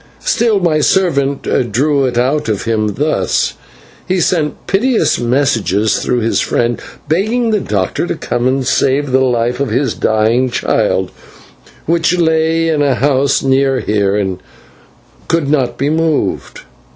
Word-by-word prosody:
Still, 235 Hz, -, +2 dB
my 165 Hz, -4 st, +1 dB
servant 140 Hz, -5 st, +1 dB, 0.3 s
drew 140 Hz, +4 st, +1 dB
it 125 Hz, -2 st, -2 dB
out 130 Hz, +1 st, 0 dB
of 105 Hz, -2 st, -2 dB
him 110 Hz, -3 st, -1 dB
thus: 140 Hz, -, 0 dB, 0.5 s
he 185 Hz, 0 st, 0 dB
sent 160 Hz, -4 st, -1 dB
piteous 230 Hz, +5 st, +1 dB
messages 115 Hz, -5 st, +1 dB
through 125 Hz, -1 st, -1 dB
his 115 Hz, -, 0 dB
friend, 120 Hz, 0 st, -1 dB, 0.3 s
begging 220 Hz, +8 st, 0 dB
the 210 Hz, -, +2 dB
doctor 100 Hz, -, -2 dB
to -, -, -2 dB
come 120 Hz, +1 st, -2 dB
and 130 Hz, 0 st, 0 dB
save 135 Hz, +2 st, +1 dB
the 130 Hz, -, +3 dB
life 120 Hz, 0 st, 0 dB
of 140 Hz, -, -1 dB
his 125 Hz, +2 st, 0 dB
dying 115 Hz, +4 st, +1 dB
child, 120 Hz, -, 0 dB, 0.7 s
which 170 Hz, +2 st, +1 dB
lay 160 Hz, 0 st, +1 dB
in 155 Hz, -2 st, +1 dB
a 140 Hz, -3 st, +2 dB
house 135 Hz, +2 st, +1 dB
near 135 Hz, 0 st, +2 dB
here, 100 Hz, -2 st, 0 dB
and 95 Hz, -3 st, -2 dB, 0.9 s
could 165 Hz, -4 st, 0 dB
not 130 Hz, -5 st, 0 dB
be 140 Hz, +2 st, 0 dB
moved. 160 Hz, -1 st, -1 dB
135 Hz, 145 wpm, -14 LUFS, 120-160 Hz, 0.9 s, the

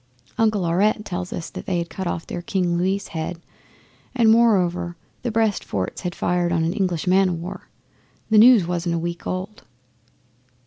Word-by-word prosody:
Uncle 215 Hz, -4 st, +2 dB
Aurette 205 Hz, +5 st, +1 dB
tells 180 Hz, -2 st, -4 dB
us 165 Hz, -, -5 dB
that -, -, -8 dB
they 185 Hz, -, 0 dB
had 170 Hz, 0 st, -2 dB
cut 190 Hz, -2 st, -4 dB
off 165 Hz, -1 st, -3 dB
their 175 Hz, -, -5 dB
King 175 Hz, -1 st, 0 dB
Louis' 190 Hz, +3 st, -1 dB
head, 165 Hz, +1 st, -4 dB, 0.8 s
and, 230 Hz, -3 st, +5 dB
moreover, 180 Hz, -7 st, +2 dB, 0.3 s
the 245 Hz, -, -2 dB
Brest 220 Hz, -2 st, +1 dB
forts 95 Hz, -2 st, -4 dB
had 180 Hz, -2 st, -4 dB
fired 175 Hz, 0 st, 0 dB
on 165 Hz, -1 st, +1 dB
an 165 Hz, +2 st, 0 dB
English 185 Hz, -6 st, -1 dB
man 190 Hz, +1 st, +4 dB
o' -, -, -1 dB
war. 170 Hz, +2 st, -7 dB, 0.6 s
The 215 Hz, -, +6 dB
news 230 Hz, -4 st, +7 dB
wasn't 175 Hz, 0 st, -1 dB
a -, -, 0 dB
week 170 Hz, +1 st, -4 dB
old. 185 Hz, +3 st, -4 dB
180 Hz, 180 wpm, -22 LUFS, 170-205 Hz, 0.8 s, news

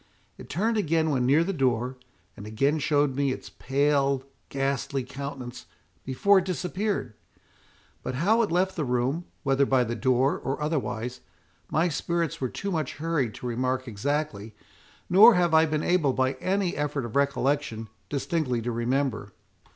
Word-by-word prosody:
It -, -, -12 dB
turned 220 Hz, -, 0 dB
again 160 Hz, -4 st, +1 dB
when 125 Hz, -3 st, +1 dB
near 150 Hz, +5 st, +5 dB
the 195 Hz, +3 st, -2 dB
door, 130 Hz, -4 st, 0 dB, 0.4 s
and 100 Hz, -, -9 dB
again 135 Hz, +8 st, +1 dB
showed 145 Hz, -2 st, +1 dB
me 140 Hz, -1 st, +1 dB
its -, -, -7 dB
pale, 140 Hz, 0 st, +1 dB, 0.3 s
ghastly 135 Hz, 0 st, -1 dB
countenance, 135 Hz, -1 st, -7 dB, 0.4 s
before 190 Hz, -, +4 dB
it 185 Hz, -, -4 dB
disappeared. 185 Hz, -, -2 dB, 0.9 s
But 125 Hz, -, -4 dB
how 205 Hz, -, +3 dB
it 220 Hz, -, 0 dB
left 185 Hz, +2 st, +1 dB
the 155 Hz, -, -1 dB
room, 130 Hz, +6 st, -1 dB, 0.2 s
whether 135 Hz, -1 st, +3 dB
by 130 Hz, -2 st, +3 dB
the 120 Hz, 0 st, -3 dB
door, 130 Hz, +4 st, +1 dB
or 135 Hz, -, -3 dB
otherwise, 125 Hz, -5 st, -2 dB, 0.5 s
my 160 Hz, +4 st, +2 dB
spirits 170 Hz, 0 st, -2 dB
were 130 Hz, -, 0 dB
too 200 Hz, +9 st, -4 dB
much 155 Hz, -6 st, -2 dB
hurried 150 Hz, -7 st, -1 dB
to -, -, -9 dB
remark 130 Hz, +2 st, -1 dB
exactly; 110 Hz, -2 st, -3 dB, 0.5 s
nor 210 Hz, +6 st, +8 dB
have 175 Hz, -2 st, +2 dB
I 160 Hz, 0 st, +6 dB
been 155 Hz, 0 st, -1 dB
able, 165 Hz, -7 st, +2 dB
by 130 Hz, 0 st, +1 dB
any 190 Hz, -1 st, 0 dB
effort 145 Hz, -3 st, -2 dB
of 115 Hz, -, -8 dB
recollection, 140 Hz, -4 st, 0 dB, 0.2 s
distinctly 145 Hz, -3 st, -1 dB
to 120 Hz, -, -2 dB
remember." 120 Hz, -3 st, -1 dB
140 Hz, 160 wpm, -26 LUFS, 125-165 Hz, 0.9 s, nor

